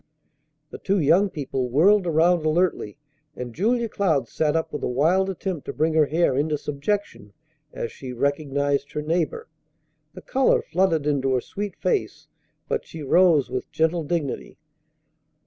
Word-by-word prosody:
The -, -, -8 dB
two 200 Hz, +1 st, 0 dB
young 175 Hz, +7 st, +4 dB
people 135 Hz, -5 st, -3 dB
whirled 180 Hz, -, +4 dB
around 170 Hz, +1 st, +3 dB
alertly, 155 Hz, -, 0 dB, 0.4 s
and 125 Hz, -2 st, -6 dB
Julia 230 Hz, -, +1 dB
Cloud 160 Hz, -, 0 dB
sat 150 Hz, +4 st, 0 dB
up 160 Hz, -1 st, -1 dB
with 150 Hz, -, -4 dB
a -, -, -1 dB
wild 165 Hz, +10 st, +2 dB
attempt 185 Hz, -4 st, -4 dB
to -, -, -5 dB
bring 160 Hz, +1 st, 0 dB
her 155 Hz, -2 st, +4 dB
hair 160 Hz, -2 st, +1 dB
into 150 Hz, +2 st, 0 dB
subjection 145 Hz, -, -4 dB, 0.4 s
as 115 Hz, -, -5 dB
she 130 Hz, -2 st, -8 dB
recognized 140 Hz, +1 st, -1 dB
her 150 Hz, -, -3 dB
neighbor. 165 Hz, +1 st, -1 dB, 0.7 s
The 185 Hz, -, -10 dB
color 265 Hz, 0 st, +2 dB
flooded 165 Hz, -4 st, +1 dB
into 135 Hz, -3 st, +1 dB
her 125 Hz, -, 0 dB
sweet 205 Hz, +7 st, -6 dB
face, 430 Hz, -5 st, -2 dB, 0.4 s
but -, -, -1 dB
she 160 Hz, -2 st, -9 dB
rose 165 Hz, -1 st, +4 dB
with 130 Hz, -, -4 dB
gentle 160 Hz, +1 st, +1 dB
dignity. 150 Hz, -3 st, -3 dB
160 Hz, 155 wpm, -24 LUFS, 140-180 Hz, 0.7 s, young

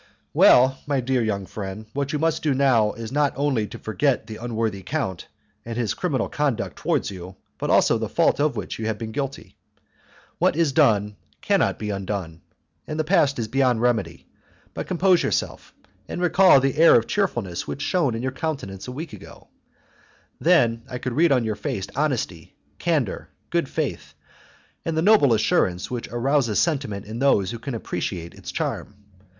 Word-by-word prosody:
"Well, 130 Hz, +2 st, +6 dB
my 140 Hz, -2 st, +1 dB
dear 130 Hz, 0 st, 0 dB
young 100 Hz, -3 st, -2 dB
friend, 100 Hz, +2 st, -7 dB
what 140 Hz, 0 st, -2 dB
you 150 Hz, -, -1 dB
must 160 Hz, +1 st, 0 dB
do 145 Hz, -4 st, +1 dB
now 125 Hz, -6 st, +3 dB
is 115 Hz, 0 st, -7 dB
not 145 Hz, 0 st, +1 dB
only 135 Hz, -6 st, 0 dB
to -, -, -9 dB
forget 125 Hz, +3 st, 0 dB
the 110 Hz, -1 st, -8 dB
unworthy 110 Hz, -4 st, -2 dB
count 95 Hz, -, -3 dB, 0.4 s
and 115 Hz, 0 st, -6 dB
his 120 Hz, -3 st, 0 dB
criminal 140 Hz, -10 st, -1 dB
conduct 145 Hz, -6 st, -2 dB
towards -, -, -1 dB
you, 90 Hz, 0 st, -9 dB, 0.2 s
but -, -, -2 dB
also -, -, +4 dB
the -, -, -3 dB
fault -, -, +2 dB
of 150 Hz, 0 st, +1 dB
which -, -, -5 dB
you 110 Hz, -, -2 dB
have 110 Hz, -1 st, -1 dB
been 110 Hz, -1 st, -6 dB
guilty. 135 Hz, +2 st, -5 dB, 0.8 s
What -, -, +3 dB
is 165 Hz, -3 st, +2 dB
done 105 Hz, -5 st, +2 dB, 0.2 s
cannot 200 Hz, -4 st, +1 dB
be 105 Hz, -1 st, -4 dB
undone, 95 Hz, -4 st, -4 dB, 0.5 s
and 155 Hz, +1 st, -4 dB
the -, -, +2 dB
past 150 Hz, -4 st, +2 dB
is 115 Hz, -2 st, -2 dB
beyond 125 Hz, -1 st, +1 dB
remedy; 120 Hz, -4 st, 0 dB, 0.5 s
but -, -, -5 dB
compose 185 Hz, 0 st, +3 dB
yourself, -, -, -2 dB, 0.4 s
and -, -, -5 dB
recall 180 Hz, -3 st, +6 dB
the 135 Hz, +1 st, 0 dB
air 165 Hz, -, +8 dB
of 115 Hz, -, +4 dB
cheerfulness 120 Hz, -, -2 dB
which 70 Hz, -, -4 dB
shone 145 Hz, -10 st, +1 dB
on 115 Hz, -, -4 dB
your 130 Hz, -, -1 dB
countenance 130 Hz, -11 st, -5 dB
a -, -, -5 dB
week 150 Hz, +5 st, -7 dB
ago. -, -, -13 dB, 0.9 s
Then 120 Hz, -10 st, +3 dB
I 125 Hz, -, -4 dB
could 125 Hz, 0 st, -4 dB
read 165 Hz, +4 st, +3 dB
on 125 Hz, -3 st, +3 dB
your 110 Hz, -1 st, -1 dB
face 95 Hz, -2 st, -4 dB
honesty, 130 Hz, -, -2 dB, 0.2 s
candour, -, -, -1 dB, 0.2 s
good -, -, 0 dB
faith, -, -, -4 dB, 0.7 s
and 165 Hz, -1 st, -2 dB
the 160 Hz, -, +2 dB
noble 205 Hz, -, +5 dB
assurance 95 Hz, -4 st, +1 dB
which 120 Hz, -2 st, -4 dB
arouses 120 Hz, -2 st, +1 dB
sentiment 135 Hz, -, -1 dB
in 110 Hz, +3 st, -6 dB
those 105 Hz, -9 st, +3 dB
who 115 Hz, -, -6 dB
can 130 Hz, +1 st, -5 dB
appreciate 90 Hz, -5 st, -4 dB
its -, -, -8 dB
charm. 105 Hz, -, -3 dB
125 Hz, 180 wpm, -23 LUFS, 110-145 Hz, 0.9 s, air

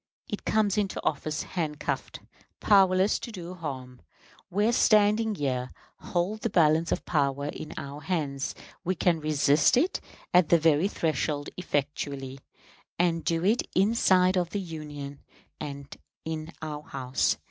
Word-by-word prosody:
It 210 Hz, -, -5 dB
comes 210 Hz, -1 st, +2 dB
into 200 Hz, -2 st, -1 dB
office 155 Hz, +1 st, -1 dB
handcuffed, 155 Hz, -4 st, -3 dB, 0.4 s
powerless 190 Hz, -1 st, +4 dB
to 235 Hz, -, -7 dB
do 180 Hz, -3 st, -7 dB
harm. 130 Hz, -7 st, -7 dB, 0.5 s
We, 205 Hz, +5 st, +2 dB
standing 215 Hz, -1 st, +4 dB
here, 130 Hz, -5 st, -1 dB, 0.3 s
hold 190 Hz, +5 st, -2 dB
the 230 Hz, -, 0 dB
balance 165 Hz, -2 st, +3 dB
of -, -, -1 dB
power 140 Hz, -2 st, 0 dB
in 155 Hz, -, -7 dB
our 140 Hz, +1 st, -6 dB
hands; 145 Hz, -5 st, -2 dB, 0.3 s
we 185 Hz, +1 st, 0 dB
can 170 Hz, -1 st, +2 dB
resist 150 Hz, +3 st, +3 dB
it 340 Hz, +9 st, +1 dB, 0.3 s
at 180 Hz, -2 st, +5 dB
the 170 Hz, -, +7 dB
very 160 Hz, +2 st, +3 dB
threshold 150 Hz, -, -1 dB
effectually; 140 Hz, -4 st, -3 dB, 0.6 s
and 170 Hz, -2 st, +1 dB
do 165 Hz, +1 st, 0 dB
it 220 Hz, +5 st, +3 dB
inside 185 Hz, -2 st, +4 dB
of 175 Hz, -2 st, +1 dB
the 205 Hz, -, -2 dB
Union, 150 Hz, -5 st, -7 dB, 0.4 s
and 140 Hz, -2 st, -7 dB, 0.3 s
in 160 Hz, 0 st, -4 dB
our 150 Hz, -1 st, -4 dB
House. 130 Hz, -3 st, -1 dB
160 Hz, 135 wpm, -28 LUFS, 145-190 Hz, 0.6 s, the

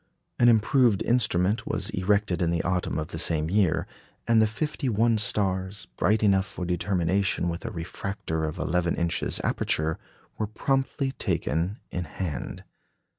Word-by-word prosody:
An 120 Hz, -, +6 dB
improved 115 Hz, -1 st, +4 dB
instrument 110 Hz, -4 st, +1 dB
was -, -, -2 dB
erected 95 Hz, -1 st, +1 dB
in 85 Hz, -, +2 dB
the 85 Hz, 0 st, 0 dB
autumn 90 Hz, -1 st, -1 dB
of 80 Hz, +1 st, -3 dB
the 80 Hz, -, -6 dB
same 80 Hz, -1 st, 0 dB
year, 95 Hz, -6 st, +2 dB, 0.4 s
and 115 Hz, -1 st, +5 dB
the 110 Hz, -, +4 dB
fifty 140 Hz, +4 st, -2 dB
one 115 Hz, 0 st, +2 dB
stars, 95 Hz, -2 st, 0 dB
bright 105 Hz, +5 st, +2 dB
enough 95 Hz, -2 st, +3 dB
for 90 Hz, 0 st, -5 dB
determination 90 Hz, +1 st, 0 dB
with 85 Hz, +6 st, -5 dB
a -, -, -2 dB
refractor 85 Hz, -2 st, -4 dB
of 80 Hz, +3 st, -4 dB
11 85 Hz, 0 st, 0 dB
inches 85 Hz, -1 st, 0 dB
aperture, 80 Hz, +1 st, 0 dB, 0.4 s
were 110 Hz, -, 0 dB
promptly 135 Hz, +4 st, -1 dB
taken 90 Hz, -, -1 dB
in 90 Hz, -1 st, -3 dB
hand. 80 Hz, -2 st, -5 dB
95 Hz, 150 wpm, -26 LUFS, 85-110 Hz, 0.4 s, An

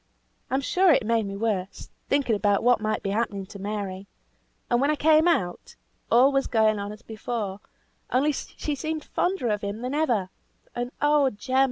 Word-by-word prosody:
I'm 265 Hz, +1 st, 0 dB
sure 365 Hz, +6 st, +3 dB
it 260 Hz, -, +3 dB
made 225 Hz, -2 st, +1 dB
me 195 Hz, 0 st, -5 dB
worse, 200 Hz, -3 st, -3 dB, 0.2 s
thinking 275 Hz, -5 st, +2 dB
about 205 Hz, -1 st, +1 dB
what 245 Hz, -2 st, +4 dB
might 215 Hz, 0 st, -1 dB
be 195 Hz, -, -1 dB
happening 205 Hz, -2 st, -1 dB
to 200 Hz, +1 st, -11 dB
Mary. 200 Hz, -1 st, -4 dB, 0.6 s
And 240 Hz, 0 st, +2 dB
when 280 Hz, -, +2 dB
I 305 Hz, -, +2 dB
came 310 Hz, +2 st, +4 dB
out, 340 Hz, -, -1 dB, 0.3 s
all 255 Hz, +4 st, +6 dB
was 275 Hz, 0 st, +1 dB
going 220 Hz, -2 st, +2 dB
on 200 Hz, 0 st, -4 dB
as 210 Hz, +2 st, -11 dB
before, 215 Hz, -3 st, -4 dB, 0.5 s
only 280 Hz, +4 st, +2 dB
she 295 Hz, +1 st, -4 dB
seemed 310 Hz, +2 st, -3 dB
fonder 360 Hz, -10 st, -1 dB
of 210 Hz, -1 st, 0 dB
him 205 Hz, +2 st, -4 dB
than 255 Hz, +2 st, -3 dB
ever; 235 Hz, -12 st, 0 dB, 0.4 s
and 245 Hz, +1 st, -3 dB
oh 295 Hz, -2 st, +4 dB
Jem! 255 Hz, +4 st, -1 dB
230 Hz, 185 wpm, -25 LUFS, 205-280 Hz, 0.6 s, all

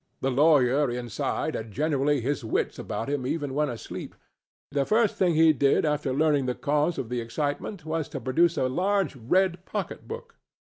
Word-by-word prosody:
The 135 Hz, -, +1 dB
lawyer 140 Hz, -1 st, +4 dB
inside 120 Hz, -3 st, -2 dB
had 110 Hz, -1 st, -5 dB
generally 145 Hz, +1 st, +1 dB
his 135 Hz, +2 st, -2 dB
wits 110 Hz, -, -1 dB
about 115 Hz, -, -4 dB
him 140 Hz, -3 st, -2 dB
even 145 Hz, -2 st, -2 dB
when 150 Hz, +1 st, +1 dB
asleep; 120 Hz, -3 st, -7 dB, 0.6 s
the 140 Hz, -1 st, +1 dB
first 220 Hz, +6 st, +2 dB
thing 180 Hz, -3 st, +2 dB
he 160 Hz, 0 st, +6 dB
did 140 Hz, +2 st, +2 dB
after 150 Hz, -2 st, 0 dB
learning 145 Hz, -1 st, +2 dB
the 125 Hz, -, -1 dB
cause 150 Hz, +3 st, 0 dB
of 120 Hz, -, -4 dB
the 125 Hz, -1 st, -2 dB
excitement 145 Hz, -, -3 dB
was 160 Hz, -1 st, -2 dB
to 140 Hz, -, -5 dB
produce 165 Hz, +8 st, +2 dB
a 130 Hz, -, +2 dB
large 190 Hz, +5 st, 0 dB
red 175 Hz, +9 st, +1 dB
pocketbook. 460 Hz, -, -6 dB
145 Hz, 170 wpm, -26 LUFS, 130-160 Hz, 0.6 s, he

